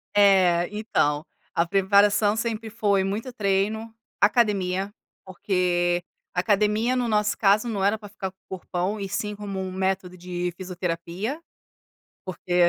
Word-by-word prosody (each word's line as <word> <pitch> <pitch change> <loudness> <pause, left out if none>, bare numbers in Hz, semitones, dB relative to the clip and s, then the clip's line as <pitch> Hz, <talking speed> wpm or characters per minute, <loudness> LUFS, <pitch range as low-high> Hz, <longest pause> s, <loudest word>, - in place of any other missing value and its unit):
É, 185 -4 +5
então, 155 -8 0 0.3
a 170 - +3
preparação 205 +3 +4
sempre 225 0 -3
foi 205 -3 +1
muito 210 +6 -3
treino, 215 +1 -1 0.3
academia, 200 -3 +2 0.3
porque 175 -2 0 0.3
academia, 210 +5 +2
no 245 -1 0
nosso 210 -2 +1
caso, 210 +3 +3
não 200 -4 -2
era 205 +3 +3
para 210 -1 -11
ficar 195 -2 -5
com 190 - -49 0.2
corpão, 185 +4 -3
e 200 - -3
sim 210 +2 -3
como 200 -2 -5
um 190 -1 -4
método 190 -1 -2
de 180 0 -4
fisioterapia. 180 - -4 0.8
Porque 180 -1 +2
195 Hz, 130 wpm, -25 LUFS, 180-210 Hz, 0.8 s, É